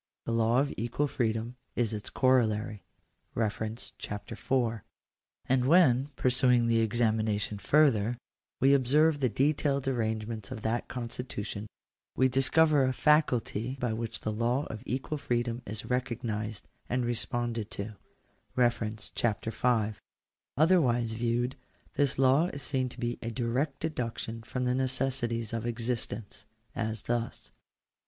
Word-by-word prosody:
the -, -, -2 dB
law 115 Hz, +2 st, +3 dB
of 140 Hz, +1 st, 0 dB
equal 120 Hz, +6 st, 0 dB
freedom 115 Hz, -2 st, -1 dB, 0.2 s
is 115 Hz, -3 st, 0 dB
its 105 Hz, -1 st, -4 dB
corollary 110 Hz, -5 st, +2 dB, 1.2 s
(Chap. 105 Hz, 0 st, -5 dB
IY). 115 Hz, -1 st, -1 dB, 0.7 s
And 130 Hz, -1 st, +2 dB
when, 140 Hz, -4 st, +5 dB
pursuing 125 Hz, -1 st, +4 dB
the 115 Hz, -1 st, +3 dB
examination 110 Hz, -2 st, 0 dB
further, 120 Hz, -5 st, +3 dB, 0.4 s
we 135 Hz, +2 st, +5 dB
observe 145 Hz, +4 st, +4 dB
the 130 Hz, -3 st, +2 dB
detailed 140 Hz, +1 st, +1 dB
arrangements 110 Hz, -4 st, -2 dB
of 120 Hz, -4 st, -7 dB
that 115 Hz, +2 st, -1 dB
constitution, 115 Hz, -4 st, -5 dB, 0.5 s
we 130 Hz, -, +4 dB
dis 135 Hz, +1 st, +1 dB
cover 155 Hz, -3 st, +5 dB
a 130 Hz, 0 st, +2 dB
faculty 130 Hz, -4 st, +2 dB
by 120 Hz, -3 st, 0 dB
which 115 Hz, 0 st, -4 dB
the 110 Hz, -, -2 dB
law 120 Hz, +6 st, 0 dB
of 110 Hz, -, -7 dB
equal 135 Hz, +4 st, -2 dB
freedom 120 Hz, -1 st, -1 dB
is 105 Hz, +2 st, -4 dB
recognised 115 Hz, -4 st, -3 dB, 0.2 s
and 125 Hz, 0 st, 0 dB
responded 120 Hz, -2 st, -2 dB
to 105 Hz, +2 st, -6 dB, 1.2 s
(Chap. 110 Hz, -3 st, 0 dB
V.). 115 Hz, -1 st, +1 dB, 0.7 s
Otherwise 135 Hz, -8 st, +3 dB
viewed, 120 Hz, +2 st, 0 dB, 0.4 s
this 140 Hz, -2 st, +1 dB
law 135 Hz, +5 st, +4 dB
is 145 Hz, -5 st, -5 dB
seen 130 Hz, -2 st, 0 dB
to -, -, -12 dB
be 120 Hz, 0 st, -2 dB
a 115 Hz, -, -3 dB
direct 125 Hz, +5 st, -1 dB
deduction 115 Hz, -6 st, -3 dB
from 125 Hz, +2 st, -3 dB
the 125 Hz, -, +2 dB
necessities 125 Hz, -3 st, 0 dB
of 115 Hz, 0 st, -2 dB
existence: 115 Hz, -3 st, -3 dB, 0.3 s
as 110 Hz, -1 st, -2 dB
thus. 120 Hz, -1 st, -3 dB
120 Hz, 130 wpm, -30 LUFS, 110-130 Hz, 1.2 s, when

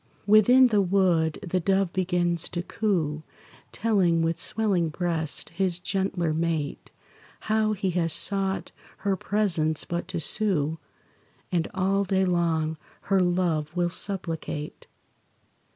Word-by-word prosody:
Within 245 Hz, +5 st, +6 dB
the 210 Hz, -3 st, +3 dB
wood 175 Hz, -4 st, +2 dB
the 185 Hz, +2 st, 0 dB
dove 190 Hz, 0 st, +1 dB
begins 175 Hz, -2 st, 0 dB
to 175 Hz, -1 st, -4 dB
coo, 170 Hz, -8 st, -1 dB, 0.5 s
Telling, 185 Hz, -7 st, +1 dB
with 165 Hz, 0 st, -1 dB
swelling 190 Hz, -5 st, +1 dB
breast, 160 Hz, -1 st, -1 dB
his 180 Hz, 0 st, 0 dB
gentler 180 Hz, -3 st, -1 dB
mate 160 Hz, -3 st, -2 dB, 0.5 s
How 215 Hz, 0 st, +1 dB
he 195 Hz, -2 st, -2 dB
has 170 Hz, -2 st, 0 dB
sought 195 Hz, +3 st, +1 dB, 0.3 s
her 200 Hz, -1 st, +2 dB
presence 175 Hz, -6 st, 0 dB
but 170 Hz, 0 st, -4 dB
to 185 Hz, -2 st, -4 dB
sue, 160 Hz, -3 st, +1 dB, 0.7 s
And 170 Hz, -2 st, 0 dB
all 195 Hz, +1 st, +1 dB
day 190 Hz, 0 st, +1 dB
long 165 Hz, -3 st, 0 dB, 0.4 s
her 190 Hz, -, +4 dB
love 175 Hz, -3 st, 0 dB
will 175 Hz, -1 st, +1 dB
supplicate. 165 Hz, -6 st, -4 dB
175 Hz, 120 wpm, -26 LUFS, 165-195 Hz, 0.7 s, Within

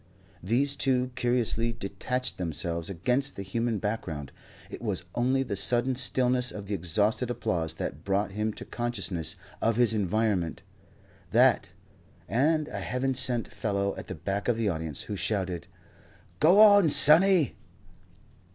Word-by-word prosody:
These 130 Hz, +9 st, +1 dB
two 130 Hz, -1 st, 0 dB
curiously 120 Hz, -1 st, 0 dB
detached 120 Hz, +4 st, -4 dB
themselves 85 Hz, 0 st, -3 dB
against 125 Hz, +10 st, -1 dB
the 100 Hz, -, -6 dB
human 115 Hz, +3 st, -2 dB
background. 90 Hz, -9 st, -4 dB, 0.4 s
It -, -, -8 dB
was 105 Hz, -6 st, -2 dB
only 130 Hz, +2 st, +1 dB
the 110 Hz, -, -4 dB
sudden 120 Hz, +6 st, +2 dB
stillness 125 Hz, 0 st, +1 dB
of 100 Hz, -1 st, -8 dB
the 100 Hz, -, -5 dB
exhausted 100 Hz, +7 st, 0 dB
applause 80 Hz, -9 st, -2 dB
that 80 Hz, -1 st, -6 dB
brought 100 Hz, +1 st, -1 dB
him 105 Hz, +2 st, -2 dB
to -, -, -9 dB
consciousness 100 Hz, -, -2 dB, 0.3 s
of 115 Hz, 0 st, +1 dB
his 120 Hz, -2 st, +4 dB
environment; 105 Hz, -4 st, -1 dB, 0.7 s
that, -, -, +3 dB, 0.6 s
and 150 Hz, +5 st, +1 dB
a 100 Hz, -, -5 dB
heaven 125 Hz, +7 st, -2 dB
sent 125 Hz, -2 st, +2 dB
fellow 100 Hz, -2 st, -2 dB
at -, -, -9 dB
the -, -, -6 dB
back 100 Hz, +1 st, -4 dB
of 120 Hz, -2 st, +1 dB
the 110 Hz, -3 st, 0 dB
audience 80 Hz, -5 st, -4 dB
who 105 Hz, -, -6 dB
shouted: 90 Hz, -3 st, -2 dB, 0.7 s
"Go 175 Hz, +6 st, +5 dB
on, 205 Hz, -5 st, +7 dB
sonny!" 165 Hz, +2 st, +6 dB
110 Hz, 140 wpm, -27 LUFS, 95-125 Hz, 0.7 s, on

